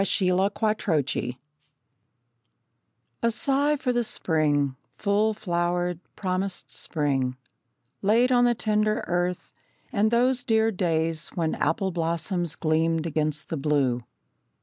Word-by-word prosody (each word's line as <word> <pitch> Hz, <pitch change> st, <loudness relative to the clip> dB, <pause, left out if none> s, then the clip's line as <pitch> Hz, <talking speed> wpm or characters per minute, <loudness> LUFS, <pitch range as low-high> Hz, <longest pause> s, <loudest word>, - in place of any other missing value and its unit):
The 195 Hz, 0 st, +1 dB
Year 180 Hz, -, +3 dB
of 195 Hz, +3 st, 0 dB
My 215 Hz, 0 st, +3 dB, 0.2 s
Heart 140 Hz, -2 st, 0 dB, 2.1 s
A 235 Hz, -, +3 dB
sigh 280 Hz, +4 st, +2 dB
for 255 Hz, -3 st, -1 dB
the 240 Hz, 0 st, +1 dB
spring, 145 Hz, -, +1 dB, 0.2 s
full 210 Hz, +1 st, +1 dB
flowered, 175 Hz, -2 st, -1 dB, 0.2 s
promised 185 Hz, 0 st, -1 dB
spring, 135 Hz, -5 st, -1 dB, 0.6 s
Laid 230 Hz, +5 st, +3 dB
on 245 Hz, -1 st, +5 dB
the 240 Hz, 0 st, +3 dB
tender 215 Hz, -1 st, 0 dB
earth, 175 Hz, 0 st, -2 dB, 0.4 s
and 215 Hz, +1 st, +3 dB
those 245 Hz, +2 st, +2 dB
dear 225 Hz, -1 st, +2 dB
days 165 Hz, -4 st, 0 dB
When 165 Hz, -2 st, 0 dB
apple 185 Hz, +5 st, 0 dB
blossoms 170 Hz, 0 st, -1 dB
gleamed 160 Hz, +1 st, +1 dB
against 155 Hz, -1 st, -1 dB
the 160 Hz, -, -2 dB
blue! 135 Hz, -4 st, +1 dB
180 Hz, 125 wpm, -26 LUFS, 160-215 Hz, 2.1 s, on